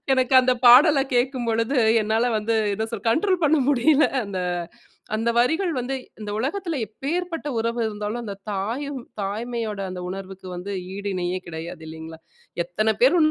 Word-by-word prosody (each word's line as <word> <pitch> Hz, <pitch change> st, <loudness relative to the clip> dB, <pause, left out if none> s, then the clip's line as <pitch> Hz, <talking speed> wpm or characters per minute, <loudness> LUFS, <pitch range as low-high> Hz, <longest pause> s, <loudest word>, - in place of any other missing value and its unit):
எனக்கு 260 Hz, 0 st, +1 dB
அந்த 255 Hz, -, +3 dB
பாடல 275 Hz, +4 st, +8 dB
கேட்கும்பொழுது 245 Hz, 0 st, +1 dB, 0.2 s
என்னால 220 Hz, +2 st, +1 dB
வந்து, 220 Hz, +2 st, -1 dB, 0.2 s
என்ன 220 Hz, +2 st, -2 dB
சொல்றது 225 Hz, 0 st, -2 dB
கண்ட்ரோல் 360 Hz, -, +1 dB
பண்ண 305 Hz, +1 st, +4 dB
முடியல. 290 Hz, +3 st, +4 dB, 0.2 s
அந்த 195 Hz, -2 st, -4 dB, 0.8 s
அந்த 225 Hz, +2 st, 0 dB
வரிகள் 320 Hz, +9 st, +1 dB
வந்து 250 Hz, +2 st, -3 dB, 0.3 s
இந்த 210 Hz, -, -5 dB
உலகத்துல 325 Hz, -, -2 dB
எப்பேற்பட்ட 325 Hz, -, -4 dB
உறவு 230 Hz, +1 st, -1 dB
இருந்தாலும் 210 Hz, +2 st, -4 dB
அந்த 200 Hz, -3 st, -5 dB, 0.2 s
தாயும், 250 Hz, +8 st, -3 dB, 0.2 s
தாய்மையோட 220 Hz, +1 st, -3 dB
அந்த 185 Hz, 0 st, -6 dB
உணர்வுக்கு 190 Hz, 0 st, -7 dB
வந்து 195 Hz, +3 st, -5 dB, 0.2 s
ஈடு 200 Hz, +1 st, -4 dB
இணையே 180 Hz, 0 st, -1 dB
கிடையாது 165 Hz, 0 st, -7 dB
இல்லைங்களா, 160 Hz, 0 st, -9 dB, 0.5 s
எத்தனை 215 Hz, +6 st, 0 dB
பேர் 270 Hz, +8 st, +6 dB
230 Hz, 145 wpm, -23 LUFS, 200-270 Hz, 0.8 s, பாடல